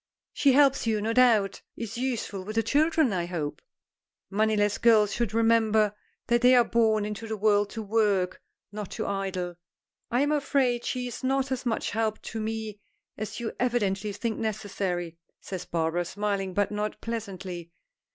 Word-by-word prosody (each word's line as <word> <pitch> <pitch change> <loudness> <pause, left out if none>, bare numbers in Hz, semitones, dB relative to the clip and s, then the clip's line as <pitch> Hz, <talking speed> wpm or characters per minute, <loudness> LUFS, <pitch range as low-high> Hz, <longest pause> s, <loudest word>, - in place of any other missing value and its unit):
"She 275 -2 +4
helps 275 -3 +4
you, 220 -1 +2
no 220 +2 -1
doubt. 225 -5 +4 0.2
Is 230 -3 -5
useful 235 -6 -3
with 215 +3 -6
the 225 - +2
children, 300 0 +2
I 175 -2 -1
hope. 150 -4 -4 0.7
Moneyless 210 0 +2
girls 215 -3 +5
should 235 -4 -1
remember 220 -2 +3 0.3
that 235 0 +2
they 250 +1 +7
are 245 - +7
born 220 -3 +2
into 210 +2 -5
the 220 -1 -3
world 205 0 +3
to 225 +1 -5
work, 200 -4 +1 0.3
not 210 -2 -6
to 220 - -3
idle." 190 -3 -3 0.5
"I 245 +2 +2
am 290 +1 +2
afraid 270 -4 +1
she 250 -1 -2
is 245 +1 -6
not 270 0 0
as 260 -1 -2
much 225 - -1
help 220 0 -1
to 225 - -3
me 220 -1 -4 0.4
as 215 +2 -5
you 235 -1 -3
evidently 210 -5 0
think 220 +2 -3
necessary," 195 -6 -3 0.2
says 185 -2 -6
Barbara 165 +1 0
smiling, 195 0 -2
but 205 0 +1
not 210 0 -3
pleasantly. 190 -7 -6
215 Hz, 165 wpm, -27 LUFS, 195-235 Hz, 0.7 s, they